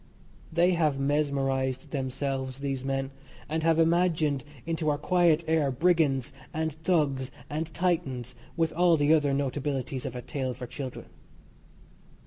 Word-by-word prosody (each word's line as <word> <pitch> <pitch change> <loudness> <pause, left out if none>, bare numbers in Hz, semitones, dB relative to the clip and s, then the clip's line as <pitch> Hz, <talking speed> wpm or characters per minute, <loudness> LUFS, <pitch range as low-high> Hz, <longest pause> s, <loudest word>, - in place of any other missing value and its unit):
They 170 +3 +4
have 155 -5 +1
mesmerised 135 -1 0
themselves, 130 -1 -2
these 135 -2 -2
men, 135 0 -2 0.4
and 160 +2 -1
have 165 0 +3
imagined 165 -4 +2 0.2
into 165 -2 -1
our 145 - +1
quiet 170 0 +3
air 160 -3 +2
brigands 140 -2 +2 0.2
and 160 -1 -1
thugs 150 -5 0 0.2
and 155 +2 -2
titans, 135 -9 -1 0.2
with 165 -1 +1
all 175 0 +4
the 145 +1 +4
other 145 -3 +3
notabilities 135 -1 -2
of 125 - -6
a 125 - -5
tale 130 -2 -3
for 125 - -6
children. 130 +1 -6
145 Hz, 135 wpm, -28 LUFS, 135-160 Hz, 0.4 s, They